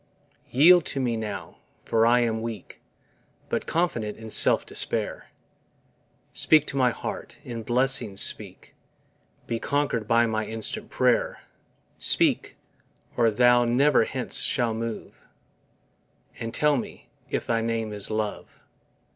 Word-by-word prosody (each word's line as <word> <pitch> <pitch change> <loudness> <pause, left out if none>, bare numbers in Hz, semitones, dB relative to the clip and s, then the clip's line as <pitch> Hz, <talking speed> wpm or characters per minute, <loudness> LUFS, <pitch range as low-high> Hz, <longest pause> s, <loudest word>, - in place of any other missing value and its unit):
Yield 170 +6 +6
to 140 - -3
me 120 -3 -1
now 110 -2 -6 0.3
for 115 0 +2
I 120 +1 +4
am 110 -2 -1
weak; 115 -2 -8 0.7
But - - -3
confident 120 -12 -1
in 110 -1 -10
self - - +3
despair: - - -3 1.1
Speak 155 -2 +4
to - - -6
my 130 -2 +3
heart, - - -7
in 115 -2 -6
blessings 120 -3 +1
speak, - - +1 0.7
Be 115 - -3
conquer'd 140 -7 -1
by 115 +1 +3
my 110 -1 -1
instant 110 -1 -5
prayer, - - 0 0.6
Speak, - - +1 0.6
or 115 -2 +3
Thou 120 +2 +4
never 125 +1 +3
hence 130 +1 +2
shalt 115 -3 0
move, 115 -1 -7 1.2
And 115 0 -5
tell 150 +4 +2
me, - - -8 0.2
if - - -3
thy 115 -1 0
name 115 -1 -2
is 105 -2 -5
LOVE. 110 -1 -4
115 Hz, 130 wpm, -25 LUFS, 110-130 Hz, 1.2 s, Yield